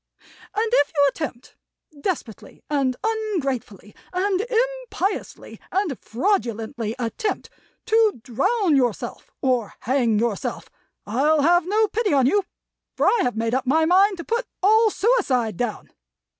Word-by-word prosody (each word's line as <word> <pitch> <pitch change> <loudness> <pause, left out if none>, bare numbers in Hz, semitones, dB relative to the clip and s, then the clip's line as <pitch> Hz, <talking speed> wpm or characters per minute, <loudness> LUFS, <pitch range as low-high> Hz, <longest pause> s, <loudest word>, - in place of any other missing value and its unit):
And 440 +2 0
if 290 -12 +3
you 285 -1 +5
attempt, 265 -4 -7 0.5
desperately 280 - -5
and 270 -3 +1
ungratefully, 280 - -3 0.2
and 375 +1 0 0.5
impiously, 390 +2 -4
and 375 -7 0
fraudulently 230 - -1
attempt, 250 - -3 0.3
to 445 - +3
drown 375 - +1
yourself, 245 -5 -1
or 250 -5 0
hang 240 -3 +1
yourself, 225 -2 -2 0.3
I'll 285 +8 +2
have 350 +2 +4
no 430 +3 +3
pity 420 -3 0
on 270 -3 +4
you, 400 +9 +3 0.5
for - - +2
I 475 - +4
have 245 -3 -1
made 225 +1 -1
up 260 0 -1
my 315 +4 +3
mind 380 +3 +4
to 340 - -6
Put 470 +5 -2 0.2
all 440 +3 +5
suicide 360 - +1
Down! 240 -3 -4
300 Hz, 130 wpm, -23 LUFS, 245-410 Hz, 0.5 s, you